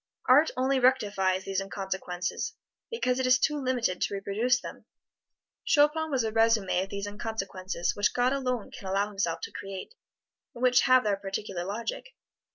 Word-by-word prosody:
Art 280 +5 +6
only 260 +1 +2
rectifies 205 -7 +2
these 195 0 -2
inconsequences, 190 +1 -4 0.3
because 255 - 0
it 260 - +1
is 255 0 +6
too 295 +3 0
limited 245 -8 0
to - - 0
reproduce 220 +6 +1
them. - - -10 0.8
Chopin 310 +1 +3
was 265 -5 +1
a 220 - -1
resume 225 -4 +2
of 190 - -5
these 200 0 -4
inconsequences 195 -4 -3
which 205 0 +2
God 250 +2 +2
alone 255 -5 -2
can 195 - -9
allow 200 +2 0
Himself 170 -5 -2
to - - -6
create, 195 - -7 0.6
and 240 - -6
which 250 -1 +5
have 255 0 +5
their 205 -2 +1
particular 195 -2 -4
logic. 225 - -5
215 Hz, 165 wpm, -28 LUFS, 195-255 Hz, 0.8 s, Art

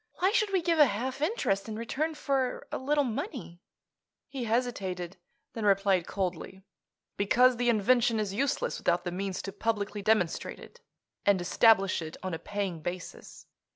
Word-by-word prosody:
Why 375 +2 +2
should 430 -3 +1
we 375 -3 +1
give 330 -1 +1
a 295 - +8
half 255 +6 -3
interest 230 - 0
in 215 - -4
return 280 +8 -2
for 270 -4 -1
a - - -3
little 290 +2 +2
money?" 240 - -5 0.7
He 260 -4 -4
hesitated; 195 -7 -2 0.4
then 225 - -5
replied 195 -3 +3
coldly: 190 0 -4 0.5
"Because 245 +5 +4
the 245 0 +1
invention 230 +1 +3
is 205 -2 -2
useless 270 +6 -1
without 175 0 +1
the 175 - -3
means 190 +1 -3
to 195 - -5
publicly 205 -1 -2
demonstrate 200 -5 +1
it, - - -14 0.4
and 200 -2 +3
establish 195 +1 +4
it 160 0 -7
on 185 -2 -3
a 165 - -3
paying 195 -3 -4
basis. 175 +2 -7
215 Hz, 160 wpm, -29 LUFS, 190-255 Hz, 0.7 s, a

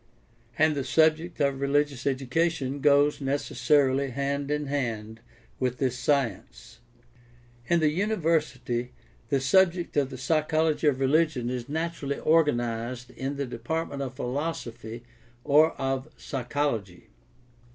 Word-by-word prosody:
And 155 0 +4
the 140 -2 -2
subject 160 +5 +2
of 140 -2 +1
religious 140 -1 0
education 140 +1 0
goes 145 +1 +4
necessarily 135 0 +1
hand 140 +2 -2
in 150 0 -1
hand 115 -6 -3 0.4
with 125 -1 -1
this 130 -2 0
science. 130 - -2 0.9
In 170 -1 +3
the 155 - +4
university 155 - -1 0.4
the 140 - +2
subject 175 +4 +2
of 140 -2 +2
the 130 - -8
psychology 155 +3 +1
of 135 -3 +2
religion 135 -3 +2
is 125 0 -5
naturally 160 -2 -2
organized 120 -6 0
in 135 +2 -4
the 140 0 -2
department 150 +2 -4
of 130 -1 -5
philosophy 125 -4 -4 0.4
or 155 +3 +5
of 135 +1 -2
psychology. 120 - -3
140 Hz, 120 wpm, -27 LUFS, 125-155 Hz, 0.9 s, or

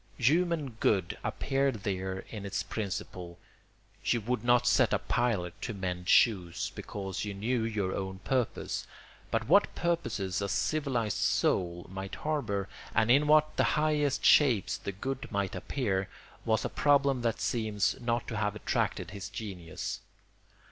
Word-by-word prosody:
Human 155 +2 +2
good 95 -5 +2
appeared 135 -6 0
there 95 -1 -2
in 105 -3 -6
its 100 -1 -2
principle; 90 -4 -5 0.7
you 120 - +2
would 125 +4 -2
not 120 +1 +4
set 120 -1 +4
a - - +4
pilot 105 -8 0
to 115 - -4
mend 90 -2 -4
shoes, 90 -7 +3
because 95 -2 -5
you 105 -2 -4
knew 115 +4 0
your 105 -4 -1
own 95 0 -4
purpose; 130 -4 -1 0.4
but - - -1
what - - +4
purposes 110 - -1
a 100 - -1
civilised 130 -5 0
soul 85 -1 +1
might 95 +1 -6
harbour, 110 -11 -2 0.3
and 110 +1 +4
in 145 +3 +5
what 155 0 +5
highest 150 -2 +2
shapes 125 -9 +5
the - - -5
good 135 +8 -5
might 100 -2 -1
appear, 95 -1 -1 0.4
was 110 -1 +1
a - - -1
problem 140 -3 +3
that 115 -2 0
seems 110 -4 0
not 120 -1 -1
to 115 - -3
have 105 -1 0
attracted 105 - -1
his 100 -1 -6
genius. 95 -6 -5
110 Hz, 145 wpm, -30 LUFS, 95-130 Hz, 0.7 s, in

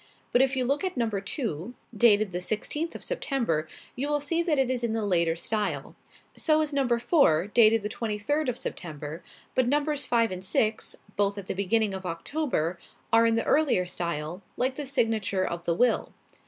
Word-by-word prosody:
But 245 - +4
if 265 0 +2
you 255 -1 +1
look 280 +6 0
at 370 -6 -2
number 220 -5 0
two, 210 - -4 0.2
dated 210 -2 +4
the 180 +1 -3
sixteenth 295 - -2
of - - -6
September, 235 - -1 0.3
you 280 +4 -2
will 295 0 +2
see 330 +4 0
that 330 -4 +1
it 265 -1 +2
is 245 -2 -1
in 230 -2 0
the 225 -2 -1
later 170 -4 +2
style. 210 +5 -2 0.4
So 310 -1 +2
is 305 -1 -2
number 260 -4 +2
four, 235 - +3
dated 220 +1 +4
the - - -1
twenty 215 -1 -3
third 290 +7 0
of 245 - -2
September; 155 - -6 0.3
but 255 -1 +2
numbers 290 +2 +1
five 230 -2 +2
and 185 0 -5
six, 215 +3 0 0.2
both 200 0 +1
at 200 - -6
the - - -3
beginning 200 +2 +1
of 190 -1 -5
October, 170 - -2 0.3
are 230 0 +6
in 225 - +2
the 230 - 0
earlier 280 -12 +3
style, 170 -1 -4 0.2
like 255 +1 +1
the 290 +1 -5
signature 225 -8 +1
of 170 -1 -4
the 170 - +1
will. 245 +6 +2
225 Hz, 195 wpm, -27 LUFS, 185-270 Hz, 0.4 s, are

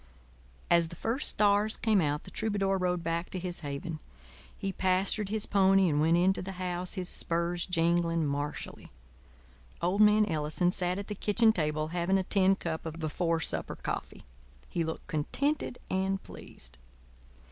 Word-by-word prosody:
As 170 -1 +5
the 170 - -10
first 230 - -2
stars 210 +1 +2
came 215 -4 +3
out 150 -1 -1
the - - -11
troubadour 195 -3 0
rode 180 -1 0
back 165 +1 -2
to - - -5
his 180 -1 -5
haven. 150 +2 -5 0.6
He 195 -1 -3
pastured 190 +2 +1
his 215 0 -1
pony 195 -1 +4
and 150 -2 +2
went 165 +2 +4
into 190 +2 +2
the 195 +1 -6
house, 180 0 -3
his 185 -1 -3
spurs 170 0 -1
jingling 170 -2 +1
martially. 145 +1 -4 0.9
Old 180 +5 +1
man 210 0 +6
Ellison 160 0 0
sat 180 -1 0
at 200 - -4
the 210 - -5
kitchen 220 +2 +3
table, 155 -2 -1
having 175 +3 +1
a 190 - 0
tin 195 0 +3
cup 165 -3 -4
of 160 0 -6
before 165 +1 -1
supper - - -3
coffee. - - -5 0.4
He 170 - -1
looked 160 0 -5
contented 265 - -1
and 190 +1 -1
pleased. - - -12
180 Hz, 160 wpm, -30 LUFS, 165-195 Hz, 0.9 s, man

